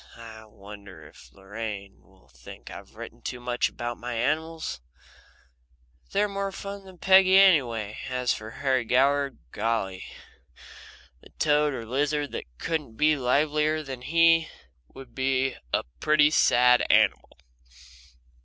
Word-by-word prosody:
I 110 -1 -11
wonder 100 -5 -13
if - - -18
Lorraine 100 0 -8
will 65 - -26
think 60 -1 -13
I've - - -12
written - - -10
too 125 - -6
much 120 0 -1
about 120 0 -6
my 120 0 -5
animals? 155 - -2 1.3
They're 210 - +1
more 200 -1 -3
fun 200 0 -8
than 190 -1 -14
Peggy 190 +1 +5
anyway, 120 - +3
and 130 - -5
as 125 -1 +1
for 110 0 -8
Harry 130 +1 -1
Goward 140 +3 +1
golly! 105 -4 -2 1.2
The - - -17
toad 150 -2 +2
or 115 -2 -6
lizard 145 +4 -1
that - - -6
couldn't 150 - -4
be 155 0 +3
livelier 150 +4 +1
than 135 -3 -8
he 165 +3 +4
is - - -14 0.4
would 130 - -14
be 130 0 0 0.2
a - - 0 0.2
pretty 150 -1 +4
sad 125 -4 +4
animal. - - +2
130 Hz, 135 wpm, -26 LUFS, 115-155 Hz, 1.3 s, Peggy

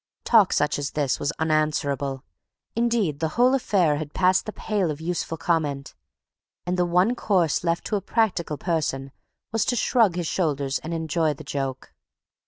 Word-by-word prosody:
Talk 220 -5 +5
such 150 0 +1
as 145 - -2
this 145 -4 0
was 145 - -1
unanswerable; 145 -4 -1 0.5
indeed, 230 -10 +1
the 160 - 0
whole 250 +2 +5
affair 185 - +2
had 150 -1 -6
passed 185 +2 +3
the - - -2
pale 205 -5 -1
of 150 -1 -4
useful 165 0 -3
comment; 145 -4 -1 0.7
and 180 +1 -1
the 180 -1 +1
one 180 +7 +3
course 185 -11 +1
left 170 -1 -1
to 215 - -1
a 200 - -1
practical 190 -10 0
person 150 -6 -2 0.4
was 225 0 +1
to 245 - 0
shrug 225 -5 +3
his 175 -1 -2
shoulders 145 -6 -1
and 160 - -7
enjoy 160 -1 0
the 155 - -10
joke. 135 -2 -4
165 Hz, 170 wpm, -24 LUFS, 145-190 Hz, 0.7 s, Talk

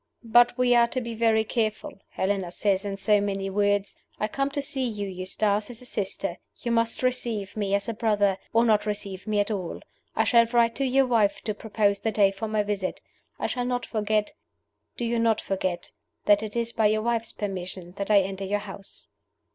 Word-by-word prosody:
"But 240 +2 +5
we 250 -1 +4
are 235 -1 +5
to 255 - -2
be 235 -2 -5
very 225 -1 +3
careful. 215 -2 -2
Helena 190 -2 -1
says, 195 +2 0
in 200 -1 -3
so 210 +1 +3
many 195 -1 -2
words, 205 0 +1 0.2
'I 215 - 0
come 275 +5 -1
to 280 - -3
see 270 -1 -2
you, 210 -5 -2
Eustace, 200 +3 -1
as 235 -2 -7
a 250 - -9
sister. 195 -5 -2 0.2
You 235 - -3
must 230 +1 +1
receive 235 -6 -1
me 200 -2 0
as 200 +3 -1
a 230 - -1
brother, 205 -3 +1
or 230 +1 +4
not 215 -2 +3
receive 200 -1 -4
me 210 -1 +1
at 205 +2 +1
all. 185 -5 -3 0.4
I - - +3
shall 235 -1 +5
write 235 -1 +3
to 275 - 0
your 270 +1 +4
wife 210 -5 +2
to 215 - -1
propose 205 -1 0
the 225 - -1
day 200 -2 +4
for 195 +3 -5
my 215 -1 +1
visit. 205 -2 -2 0.4
I - - -3
shall 245 -2 -1
not 245 0 -1
forget 215 -1 0 0.6
do 240 - -2
you 235 0 0
not 230 -1 +3
forget 185 -2 -3 0.3
that 205 0 +5
it 215 0 -6
is 235 0 -1
by 220 -2 +3
your 215 +1 +1
wife's 230 -1 0
permission 185 -3 -5
that 200 - -3
I 205 -2 +6
enter 195 0 -4
your 205 +2 0
house. 200 -1 -8
210 Hz, 210 wpm, -26 LUFS, 200-230 Hz, 0.6 s, I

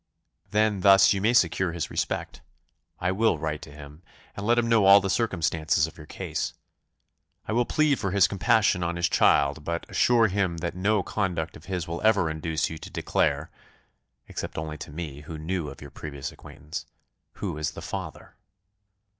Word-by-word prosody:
"Then, 105 -1 +2
thus 95 +1 +7
you 100 - -2
may 110 +4 +3
secure 90 -5 +2
his 85 -2 -4
respect. - - -3 0.6
I 90 +1 0
will 105 -2 +2
write 75 0 -3
to 75 - -11
him, 75 +1 -12 0.3
and 100 +1 -5
let 120 +1 +4
him 120 -1 +2
know 115 -4 +4
all 100 +1 +9
the 95 -1 -2
circumstances 80 -8 +1
of 80 - -10
your 75 -2 -12
case. - - -4 0.9
I - - -2
will 120 +2 +2
plead 155 -3 +2
for 95 - -1
his 95 0 +4
compassion 100 -1 +2
on 85 0 -1
his 85 0 +1
child, 70 -1 +3
but 85 +2 -3
assure 120 -2 +4
him 95 -3 -1
that 85 +1 -3
no 100 +2 +1
conduct 85 -6 -2
of 80 - -13
his 90 -3 -3
will 85 +1 -4
ever 100 -7 +3
induce 80 0 -1
you 80 - -7
to - - -9
declare 75 +3 0 0.8
(except - - -6
only 75 -1 -5
to - - -8
me, 75 -3 -6
who 80 +1 -8
knew 80 0 -3
of 70 - -12
your 70 - -11
previous 70 -2 -6
acquaintance) 80 +1 -9 0.5
who 75 - -4
is 75 - -1
the - - -8
father." - - -7
85 Hz, 185 wpm, -26 LUFS, 80-100 Hz, 0.9 s, all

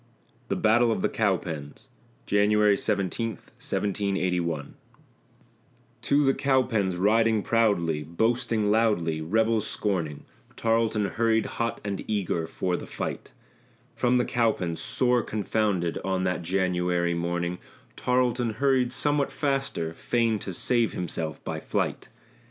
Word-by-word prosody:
THE - - -1
BATTLE 115 +2 +3
OF - - -1
THE - - +2
COWPENS 85 -9 -2 0.4
[January 105 0 +4
17, 100 +3 -1
1781] 90 -6 -2 1.3
To 145 +1 +2
the 135 - +4
Cowpens 130 -9 +1
riding 110 +2 +3
proudly, 95 -9 +2
boasting 110 - 0
loudly, 95 -8 +1
rebels 110 +5 +1
scorning, 85 -8 -2 0.3
Tarleton 115 -2 +1
hurried, 110 +2 +1
hot 115 0 -3
and 100 -2 -3
eager 90 -6 -1
for 90 +1 -2
the - - -6
fight; - - -5 0.7
From 125 0 +2
the 125 - +2
Cowpens, 110 -9 0
sore 125 -1 +2
confounded, 105 -5 -1
on 95 -1 -1
that 90 -1 -1
January 90 -1 0
morning, 85 +1 -2 0.4
Tarleton 125 -2 +1
hurried 130 0 +2
somewhat 145 +1 +1
faster, 135 - -1
fain 115 +3 0
to 95 - -5
save 120 +5 +1
himself 80 -3 -4
by - - -4
flight. - - -2
105 Hz, 115 wpm, -26 LUFS, 90-115 Hz, 1.3 s, January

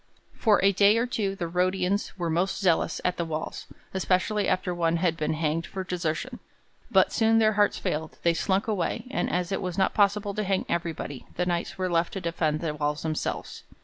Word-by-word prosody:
For 215 -3 +3
a 200 - +6
day 200 +3 +5
or 230 - +2
two 210 -6 -2
the 175 -3 -3
Rhodians 185 +3 0
were 170 -3 -1
most 175 +4 0
zealous 180 -5 +2
at 180 - +1
the 170 - 0
walls 160 -1 -5 0.3
especially 190 +3 +1
after 185 -1 0
one 170 -1 +1
had 165 -1 +1
been 155 -1 -1
hanged 155 +1 -1
for 190 - -5
desertion 180 +7 -3 0.5
but - - +4
soon 225 0 +3
their 220 -1 +4
hearts 205 0 +2
failed; 155 +1 -3
they 170 - +4
slunk 190 +5 0
away, 210 +1 -1
and - - -1
as 180 0 -1
it 195 - -1
was 180 -1 -4
not 190 - +2
possible 205 0 +2
to 215 - -2
hang 190 -1 0
everybody 165 -5 -3
the 180 - 0
Knights 175 -1 -2
were 185 0 0
left 170 -1 +1
to 195 - -3
defend 160 -3 -1
the 160 -3 -2
walls 150 0 -2
themselves. 155 -1 -3
180 Hz, 205 wpm, -27 LUFS, 165-200 Hz, 0.5 s, a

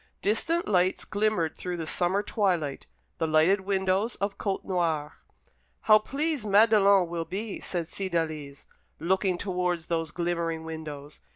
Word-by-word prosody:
Distant 330 +12 +1
lights 185 -2 +1
glimmered 205 -6 0
through 180 -1 -4
the 165 - -4
summer 185 +5 +1
twilight, 175 -10 -1 0.3
the 160 - +1
lighted 160 +6 +4
windows 190 +3 0
of 200 0 -3
Côtenoir. 170 -6 -1 0.7
"How 215 -1 +6
pleased 285 +3 -2
Madelon 200 -3 +5
will 165 -1 -3
be," 205 +3 -5
said 170 -3 -3
Cydalise, 160 -7 -3 0.3
looking 185 +2 +1
towards 180 -3 -2
those 165 -2 -1
glimmering 170 -1 -2
windows. 155 -3 -8
180 Hz, 125 wpm, -27 LUFS, 165-200 Hz, 0.7 s, How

